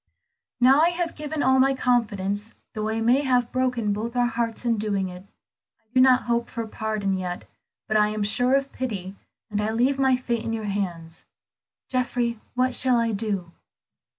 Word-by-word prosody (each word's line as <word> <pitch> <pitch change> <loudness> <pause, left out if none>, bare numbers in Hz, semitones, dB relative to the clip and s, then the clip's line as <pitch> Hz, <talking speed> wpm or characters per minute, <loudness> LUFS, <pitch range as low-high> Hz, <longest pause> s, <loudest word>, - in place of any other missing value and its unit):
"Now 265 +4 +6
I 335 - +5
have 345 -1 -2
given 300 0 -3
all 265 0 +4
my 270 +1 +4
confidence 210 -4 0 0.2
though 215 -1 -2
I 220 +1 -1
may 245 +5 +4
have 250 -3 +1
broken 250 -5 0
both 230 +4 -4
our 245 0 +3
hearts 235 0 -2
in 230 -2 +1
doing 200 -3 -1
it. 180 +2 -11 0.5
I - - -41
do 255 - +5
not 255 -1 +5
hope 235 0 -1
for 230 -2 -4
pardon 215 -2 -2
yet, 180 -1 -4 0.4
but 215 - +2
I 210 0 +4
am 215 0 -2
sure 245 +5 +2
of 275 0 0
pity, 200 -7 -4 0.4
and 210 0 0
I 210 - 0
leave 250 +5 +1
my 265 -1 +4
fate 235 -2 -2
in 225 -1 -3
your 220 -1 -3
hands. 175 -5 -4 0.6
Geoffrey, 245 -2 -1 0.2
what 255 +1 +2
shall 255 -1 +3
I 230 -1 +1
do?" 200 -5 -2
230 Hz, 185 wpm, -25 LUFS, 210-255 Hz, 0.6 s, Now